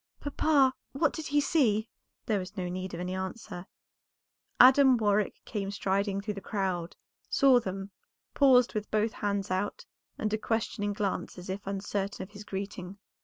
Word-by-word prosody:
"Papa, 285 -2 +3 0.2
what 295 +2 +1
did 315 -2 -5
he 290 +1 +2
see?" 230 -8 +2 0.4
There 210 -3 +1
was 185 +3 -8
no 180 -1 -2
need 185 0 -4
of - - -6
any 180 +1 -3
answer; 190 -1 -6 0.9
Adam 260 0 +8
Warwick 210 -2 +1
came 200 -3 -3
striding 200 0 0
through 210 +1 -3
the 200 - -7
crowd, 185 -4 -2 0.3
saw 265 -3 +5
them, 195 -2 -5 0.4
paused 255 -3 +5
with 215 -2 -3
both 215 +1 +1
hands 200 -2 -2
out, 190 +2 -2 0.3
and 215 0 -2
a 215 - 0
questioning 215 -2 -1
glance 200 -2 -3
as 180 +1 -6
if 195 +1 -6
uncertain 195 0 -3
of 190 - -12
his 205 0 -10
greeting. 195 -1 -6
205 Hz, 165 wpm, -29 LUFS, 190-230 Hz, 0.9 s, Adam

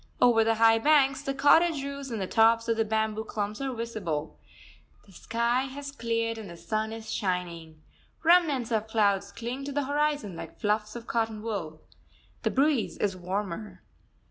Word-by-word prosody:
Over 235 -2 +5
the 225 0 +2
high 225 0 +5
banks, 275 0 +4
the 275 -1 -3
cottage 295 +2 +4
roofs 280 -1 -6
and 225 -3 -3
the 190 - -1
tops 225 +3 +3
of 230 - +2
the 225 - +2
bamboo 220 0 -1
clumps 210 +1 -4
are 270 -1 -2
visible. 215 -11 -4 0.7
The 200 - -19
sky 235 +6 0
has 280 +1 -7
cleared 230 -3 -2
and 210 -4 -8
the 170 - -10
sun 215 +4 -2
is 225 0 -6
shining. 170 -5 -3 0.4
Remnants 315 -8 +4
of 220 -1 0
clouds 205 -3 +1
cling 245 +4 -5
to 285 - -4
the 290 +1 -1
horizon 290 - 0
like - - -9
fluffs 210 +1 -1
of 235 -1 -7
cotton 225 -2 -2
wool. 175 -9 -4 0.6
The - - +1
breeze 275 -3 +1
is 200 -2 0
warmer. 190 - -5
225 Hz, 170 wpm, -28 LUFS, 210-265 Hz, 0.7 s, Over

